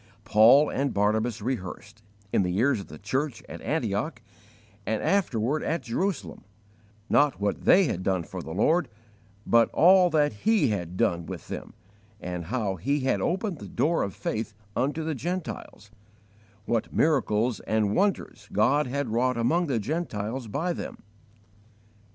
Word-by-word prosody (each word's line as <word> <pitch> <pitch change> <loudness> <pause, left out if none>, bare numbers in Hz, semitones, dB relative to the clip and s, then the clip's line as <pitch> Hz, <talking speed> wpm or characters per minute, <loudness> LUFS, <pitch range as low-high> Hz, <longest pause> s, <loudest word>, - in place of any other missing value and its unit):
Paul 120 +8 +6
and 140 0 -1
Barnabas 110 +2 +1
rehearsed, 105 -2 -5 0.3
in - - +4
the 90 0 -1
ears 130 +1 +2
of 100 - -8
the 75 - -10
church 130 - -2
at - - -9
Antioch, 115 -1 -2 0.6
and 110 +1 -2
afterward 150 - +1
at 165 - -2
Jerusalem, 180 +11 -3 0.6
not 145 -1 +3
what 100 0 -2
they 195 - +6
had 120 - -1
done 95 -2 0
for 90 +2 -7
the 80 - -9
Lord, 160 - +2 0.6
but 115 0 +4
all 180 +1 +6
that 150 -4 +2
He 215 - +2
had 90 -4 -3
done 85 -2 0
with - - -8
them, - - -7 0.4
and 90 -3 -5
how 105 -2 -2
He 140 - 0
had 130 - 0
opened 185 -2 -1
the - - -8
door 165 +2 +1
of 100 - -3
faith 110 -1 -4 0.2
unto 145 +6 0
the 160 0 -2
Gentiles; 160 - -5 0.7
what 115 -1 -1
miracles 125 -6 +1
and 110 -2 0
wonders 190 - -1
God 130 +8 +2
had 140 0 -2
wrought 125 +2 +1
among 165 +10 +1
the 135 -5 0
Gentiles 120 -2 -3
by 160 - -1
them. - - -7
120 Hz, 150 wpm, -26 LUFS, 105-155 Hz, 0.7 s, Paul